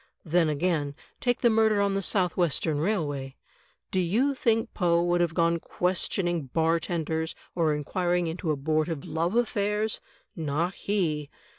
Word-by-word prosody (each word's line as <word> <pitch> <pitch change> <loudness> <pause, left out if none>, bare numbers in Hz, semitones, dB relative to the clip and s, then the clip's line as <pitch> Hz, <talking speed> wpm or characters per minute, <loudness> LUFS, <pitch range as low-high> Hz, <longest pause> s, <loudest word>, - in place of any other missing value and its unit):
Then, 165 0 +3
again, 150 -2 0 0.2
take 245 -1 0
the 235 - +5
murder 220 -1 +3
on 200 -1 +2
the 195 - 0
South 180 -2 +1
Western 160 -3 +1
Railway. 145 -7 -1 0.6
Do 190 - +1
you 225 +11 +2
think 225 -4 +1
Poe 170 -3 +2
would 175 0 +2
have 165 -2 0
gone 170 -1 +2
questioning 175 -3 -1
bartenders 160 +1 0 0.2
or 160 -3 +2
inquiring 175 +4 0
into 165 +1 -3
abortive 155 +1 0
love 170 +5 -1
affairs? 210 -2 0 0.4
Not 165 +3 -1
he! 160 -8 -1
170 Hz, 140 wpm, -27 LUFS, 160-195 Hz, 0.6 s, the